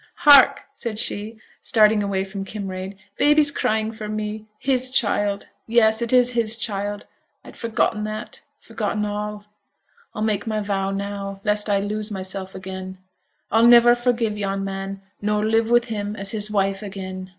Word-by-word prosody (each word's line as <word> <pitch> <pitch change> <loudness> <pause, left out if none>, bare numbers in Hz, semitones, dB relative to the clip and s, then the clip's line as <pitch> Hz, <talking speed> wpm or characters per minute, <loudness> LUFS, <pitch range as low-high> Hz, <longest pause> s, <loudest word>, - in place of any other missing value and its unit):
'Hark!' 285 -3 +7
said 225 -3 -5
she, 215 +1 -3 0.2
starting 215 -1 +4
away 195 -1 -1
from 195 0 -6
Kinraid, 195 -1 -6 0.2
'baby's 295 0 +4
crying 220 -4 -1
for 215 -1 -7
me. 215 0 -4
His 260 +1 0
child 205 -5 +1 0.2
yes, 220 -1 +3
it 235 - 0
is 250 -1 +4
his 230 -2 +1
child 205 -2 -1 0.4
I'd - - -13
forgotten 220 -2 -1
that 215 0 -7 0.2
forgotten 215 -2 -3
all. 210 0 -5 0.7
I'll 215 - -2
make 210 -1 -1
my 215 -1 -1
vow 195 -2 -2
now, 195 0 -5
lest 210 0 0
I 200 -1 +2
lose 210 +1 -3
mysel' 190 -1 -4
again. 190 0 -7 0.5
I'll 225 +2 +5
never 240 0 +7
forgive 240 -3 -1
yon 195 -1 -2
man, 195 0 -5 0.2
nor 210 0 0
live 225 +1 +1
with 240 0 +4
him 210 -2 -4
as 195 -2 -2
his 210 -1 +1
wife 195 -1 0
again. 190 -2 -7
210 Hz, 160 wpm, -22 LUFS, 195-225 Hz, 0.7 s, Hark